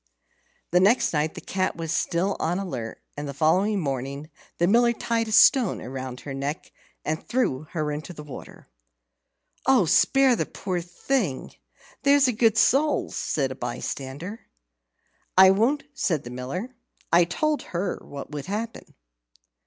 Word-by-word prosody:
The 180 - +5
next 205 +4 +3
night 155 +1 0
the - - -7
cat 185 -1 -1
was 165 -1 -4
still 180 +3 0
on 170 +3 0
the 195 - -2
alert, 125 -11 -5 0.2
and 145 0 -5
the 140 - -6
following 185 +8 +2
morning 140 0 -4 0.3
the 170 - +2
Miller 235 +5 +4
tied 230 -1 -1
a - - -5
stone 230 0 +5
round 130 -1 -6
her 140 - -6
neck, 140 +3 -4 0.3
and 155 +1 -2
threw 155 - -1
her 155 -3 -1
into 150 +4 -5
the 150 -3 -9
water. 145 -3 -11 1.0
"Oh, 260 -8 +5
spare 265 - +4
the - - -2
poor 180 -3 -3
thing, 175 - -2 0.5
there's 280 -1 +5
a - - +3
good 225 0 +3
soul," 290 +6 +3
said 135 -3 -1
a - - -5
bystander. 135 - -6 0.9
"I 190 0 +9
won't," 240 +9 +2
said 175 - 0
the 120 - -8
Miller. 135 - -5 0.4
"I 170 +1 +7
told 300 - 0
her 180 +2 -3
what 140 +1 -9
would 150 +2 -6
happen." 220 +4 -5
175 Hz, 155 wpm, -25 LUFS, 145-225 Hz, 1.0 s, I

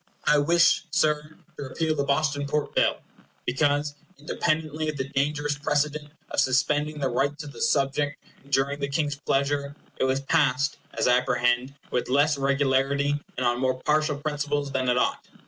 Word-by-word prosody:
I 150 - +5
wish, 170 +4 +4
Sir, 155 -2 0 0.2
to - - -5
repeal 155 +4 -1
the 140 - 0
Boston 145 0 0
Port 150 +1 -1
Bill, - - +2 0.5
because—independently 150 +2 -1
of 150 - -4
the 130 0 -3
dangerous 145 +1 -1
precedent 150 0 -1 0.2
of - - 0
suspending 145 +4 +1
the 140 -2 0
rights 140 +5 -1
of 145 - -8
the - - -10
subject 145 +1 +1 0.3
during 140 +1 +1
the 140 0 -2
King's 145 0 -1
pleasure—it 140 0 -2
was 130 0 +1
passed, 140 -2 +1 0.2
as - - +2
I 125 0 +5
apprehend, 125 +2 0 0.2
with 125 - -1
less 145 +3 +3
regularity 140 +1 +1 0.2
and 130 - -1
on 120 0 +1
more 130 -1 0
partial 150 -1 +1
principles 145 -1 -2
than 130 -2 0
it 125 - +2
ought. - - 0
145 Hz, 160 wpm, -26 LUFS, 135-150 Hz, 0.5 s, I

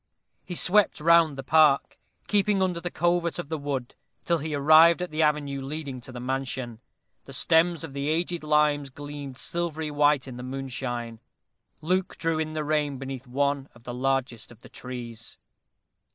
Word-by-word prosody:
He 180 - -7
swept 200 +1 +4
round 165 -2 +4
the 135 - -5
park, 150 0 +3 0.3
keeping 205 -1 +2
under 180 -2 -1
the 175 - -3
covert 175 0 0
of 175 -4 -6
the 160 - -2
wood, 140 -4 -4 0.3
till 170 -1 +1
he 155 0 -3
arrived 155 +4 +6
at 180 -2 -4
the 155 +1 -1
avenue 145 -3 0
leading 135 -2 -6
to 130 - -10
the 125 - -7
mansion. 130 -2 -4 0.5
The 135 - -10
stems 165 +4 +3
of 155 -4 -7
the 140 +1 -2
aged 170 +1 -1
limes 150 -2 +2
gleamed 145 -1 -8
silvery 160 -2 -3
white 145 -2 +2
in 125 -2 -8
the - - -7
moonshine. 125 -3 -5 0.6
Luke 185 +3 -1
drew 165 -1 0
in 155 0 -2
the 155 -1 -2
rein 150 -2 0
beneath 135 -1 -7
one 140 +2 -1
of 120 - -18
the 120 - -6
largest 125 -3 -2
of 120 -1 -17
the - - -14
trees. 120 -3 -8
145 Hz, 175 wpm, -26 LUFS, 130-160 Hz, 0.6 s, arrived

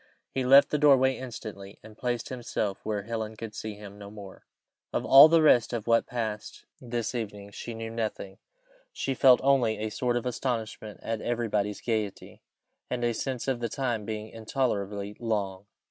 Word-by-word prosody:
He 130 - -1
left 135 +3 +7
the 150 - +1
doorway 135 -3 +5
instantly, 110 -5 -8
and 110 0 -13
placed 120 0 -3
himself 120 -5 -3
where 105 -2 -2
Helen 110 0 -4
could 110 0 -7
see 110 -1 -6
him 100 0 -11
no 100 -1 -9
more. 100 -2 -12 0.4
Of - - -1
all 135 +3 +10
the 165 0 +4
rest 125 -6 +5
of 115 -3 -3
what 115 0 +3
passed 110 -3 -5 0.2
this 120 -2 -3
evening 105 -4 -5
she 115 +3 -7
knew 115 0 -5
nothing; 110 -4 -4 0.5
she 135 - -2
felt 130 -1 +6
only 130 -5 +3
a 110 0 -3
sort 120 +2 0
of 120 - -4
astonishment 115 -4 -3
at 115 -1 -3
everybody's 105 -4 -1
gaiety, 110 -4 -3 0.5
and 125 -1 -2
a 120 0 +1
sense 130 +2 -3
of 130 -3 0
the 120 -1 -2
time 120 -3 -2
being 110 0 -5
intolerably 105 -4 -2
long. 100 -4 -2
115 Hz, 175 wpm, -28 LUFS, 105-125 Hz, 0.5 s, all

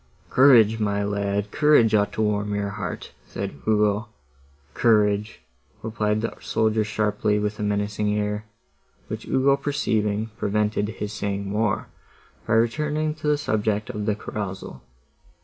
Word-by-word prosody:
"Courage, 115 -5 +6
my 100 -1 0
lad, 100 0 -1
courage 150 -8 +4
ought 105 -1 +3
to 110 - 0
warm 105 -1 0
your 100 0 -1
heart," 100 -4 -6 0.2
said - - -5
Ugo. 105 0 +2 0.7
"Courage!" 105 -2 +2 0.4
replied 110 -1 -1
the 115 - -2
soldier 110 0 +1
sharply, 105 0 0
with 105 0 -2
a - - -3
menacing 105 0 0
air, 105 +1 -2 0.6
which - - -6
Ugo 135 +1 +3
perceiving, 110 -7 -1
prevented 105 0 0
his 105 -1 -5
saying 100 -1 -3
more, 105 +1 -1 0.6
by - - +1
returning 150 +7 +1
to 155 -1 -6
the 150 0 +3
subject 110 -5 -1
of 105 0 -4
the 105 - +2
carousal. 95 -10 -6
105 Hz, 135 wpm, -24 LUFS, 105-110 Hz, 0.7 s, Courage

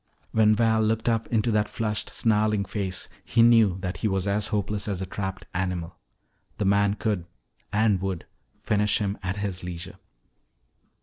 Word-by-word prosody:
When 110 -1 +4
Val 110 0 +3
looked 110 +1 0
up 115 -1 +1
into 115 0 +1
that 105 -1 +1
flushed, 105 -2 -2
snarling 105 -2 +1
face, 95 -3 -3 0.2
he 115 -1 +3
knew 115 -6 +5
that 95 -1 -3
he 110 - -1
was 95 -1 0
as 105 +1 +1
hopeless 105 0 -1
as 100 -3 -2
a 95 - -2
trapped 95 0 -5
animal. 90 -2 -2 0.6
The 105 - -1
man 100 +1 +3
could 105 -6 -2 0.4
and 105 -3 +2
would 95 -3 -3 0.3
finish 105 0 +1
him 100 -1 -2
at 95 0 -2
his 100 -3 -3
leisure. 90 +2 -6
105 Hz, 165 wpm, -26 LUFS, 95-110 Hz, 0.6 s, knew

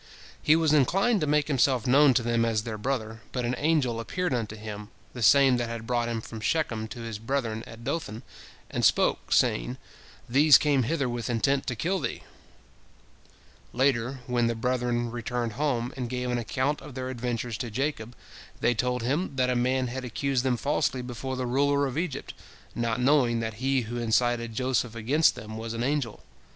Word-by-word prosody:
He 155 - +5
was 160 -2 +3
inclined 195 - +3
to 150 - 0
make 150 0 +2
himself 130 -4 +2
known 135 +1 +5
to 120 - +2
them 115 0 +1
as 110 -2 0
their 110 -2 -5
brother, 115 -2 -3
but 125 -2 -2
an 120 - 0
angel 145 -7 +1
appeared 180 +7 -2
unto 110 -3 -2
him, 105 -1 -8 0.2
the 125 - -7
same 135 +2 +6
that 120 -1 -2
had 115 -1 -5
brought 120 0 0
him 115 -1 -2
from 110 0 -8
Shechem 110 -3 -1
to 120 - -8
his 115 -2 -5
brethren 115 -2 -2
at 115 0 -11
Dothan, 115 -5 -4 0.5
and - - -2
spoke, - - +2
saying, - - +2 0.5
"These 140 +4 +7
came 145 -3 +2
hither 140 +2 0
with 120 0 -3
intent 135 +4 +1
to 120 - -1
kill 185 - -1
thee." - - -4 1.5
Later, 130 0 +1
when 120 -2 +1
the 115 - -1
brethren 120 0 -1
returned 120 -1 -3
home, 125 -3 -1
and 125 -2 -4
gave 125 0 -2
an 120 - 0
account 130 +5 -1
of 145 -4 -11
their 130 -1 -4
adventures 120 -2 -3
to 125 -2 -3
Jacob, 125 -1 -3 0.4
they 120 - +2
told 125 +1 -1
him 140 +5 -1
that 125 -1 +2
a - - 0
man 130 +1 +1
had 130 +2 -4
accused 130 +1 -1
them 130 -2 +1
falsely 130 -2 0
before 130 +2 -5
the 130 0 -2
ruler 140 +3 +2
of 135 -2 -4
Egypt, 160 -4 -3 0.4
not 115 0 -1
knowing 125 -3 +3
that 115 -1 -3
he 135 0 +2
who 120 +1 -5
incited 115 0 +1
Joseph 125 -2 0
against 135 +8 +3
them 110 +1 -8
was 115 0 -5
an 115 - -2
angel. 135 -4 -2
125 Hz, 190 wpm, -27 LUFS, 115-135 Hz, 1.5 s, These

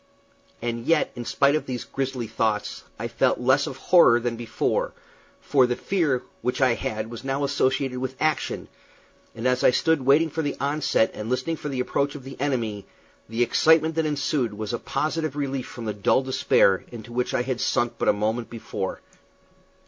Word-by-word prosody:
And 120 0 -3
yet, 165 -2 +3
in 120 -1 -6
spite 140 +4 +3
of 155 - -2
these 125 -2 -3
grisly 135 -3 -3
thoughts, 110 -1 -1
I - - -3
felt - - +1
less 130 +3 +3
of 135 - -6
horror 135 -8 +5
than 120 0 -2
before, 115 0 -1 0.5
for 130 -3 +3
the 125 - 0
fear 150 -7 0 0.2
which 125 - -1
I 130 -3 +4
had 110 -1 -4
was 120 - -8
now 135 +1 -1
associated 135 -2 0
with 130 0 -4
action; 155 -1 -1 0.7
and 115 +3 -1
as 125 0 +1
I - - +7
stood 160 +4 +2
waiting 145 +4 +4
for 160 - -2
the 145 -2 -2
onset 140 -4 +1
and 105 +1 -6
listening 130 +6 -1
for 150 - -5
the 130 -2 -1
approach 140 +3 -1
of 140 - -8
the 135 0 -9
enemy, 115 -8 -2 0.4
the 115 +2 +1
excitement 160 +5 +4
that 160 -1 0
ensued 140 -6 -1
was 110 +2 -4
a 120 - -1
positive 155 -2 -2
relief 135 -3 -2
from 120 - -8
the 105 - -2
dull 105 +6 +2
despair 130 -7 +3
into 120 0 -9
which 125 +1 -1
I 125 - +1
had 130 -1 -3
sunk 120 -2 +1
but - - 0
a - - +5
moment 110 +3 -1
before. 115 -2 -5
130 Hz, 190 wpm, -25 LUFS, 120-140 Hz, 0.7 s, I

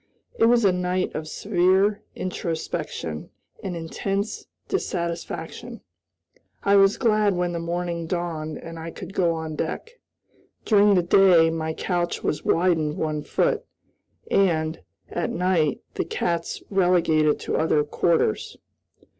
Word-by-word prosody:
It - - +6
was 235 -1 +4
a 195 - +6
night 180 0 -1
of 155 0 -4
severe 190 +3 +2
introspection 160 - -4 0.3
and 185 -2 -3
intense 195 +5 -3 0.2
dissatisfaction. 170 - -4 0.8
I 200 0 +4
was 195 0 +5
glad 215 -5 +2
when 175 0 0
the 170 - -3
morning 170 0 -3
dawned 165 -3 -3
and 165 0 -9
I 165 +1 -6
could 185 +2 -9
go 175 -4 +2
on 160 -1 -5
deck. 460 - -5 0.7
During 205 -2 +5
the 180 - +3
day 175 -2 +5
my 160 -1 -3
couch 175 -2 -2
was 150 - -1
widened 165 -4 +2
one 155 -1 -1
foot, - - 0 0.7
and, 160 -4 +2 0.3
at 175 - -1
night, 170 -5 +1
the - - -2
cats 170 0 -2
relegated 170 -5 +3
to - - -1
other 155 -2 +2
quarters. 155 -4 0
175 Hz, 130 wpm, -24 LUFS, 160-190 Hz, 0.8 s, It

